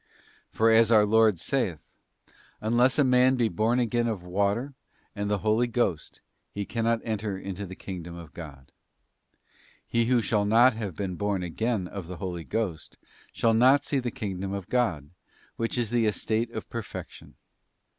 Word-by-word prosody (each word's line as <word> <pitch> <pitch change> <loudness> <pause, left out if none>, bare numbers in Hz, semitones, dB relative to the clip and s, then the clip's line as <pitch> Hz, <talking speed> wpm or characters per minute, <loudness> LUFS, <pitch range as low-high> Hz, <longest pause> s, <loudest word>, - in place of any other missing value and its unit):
For 115 +1 +3
as 115 0 +5
our 105 -2 +6
Lord 110 -2 +4
saith, 95 - -1 0.5
' - - -34 0.3
Unless 120 +4 +2
a 145 - +5
man 130 0 +4
be 120 -3 +1
born 110 +6 +1
again 120 0 +1
of 105 -6 -3
water 100 +9 -1 0.4
and 100 0 -2
the 105 - +1
Holy 110 +3 +3
Ghost, 115 -9 -2 0.3
he 100 0 -5
cannot 115 +1 0
enter 105 -3 -3
into 95 +1 -6
the 95 - -9
kingdom 85 -3 -7
of 85 -3 -11
God.'* 70 -6 -10 1.1
He 115 0 +1
who 125 -1 +3
shall 105 +1 +1
not 120 +4 +5
have 105 -6 -5
been 95 -1 -4
born 100 -3 -1
again 100 +3 -2
of 95 -3 -7
the 90 0 -7
Holy 90 -1 -5
Ghost 90 -6 -4 0.3
shall 115 -1 +2
not 130 +5 +5
see 140 - 0
the 125 -1 -2
kingdom 100 -6 -4
of 100 0 -5
God, 80 - 0 0.4
which 115 +2 -2
is 120 -3 -1
the 120 -2 +2
estate 110 +2 -1
of - - -7
per 115 - -4
fection. - - -10
110 Hz, 175 wpm, -27 LUFS, 95-120 Hz, 1.1 s, our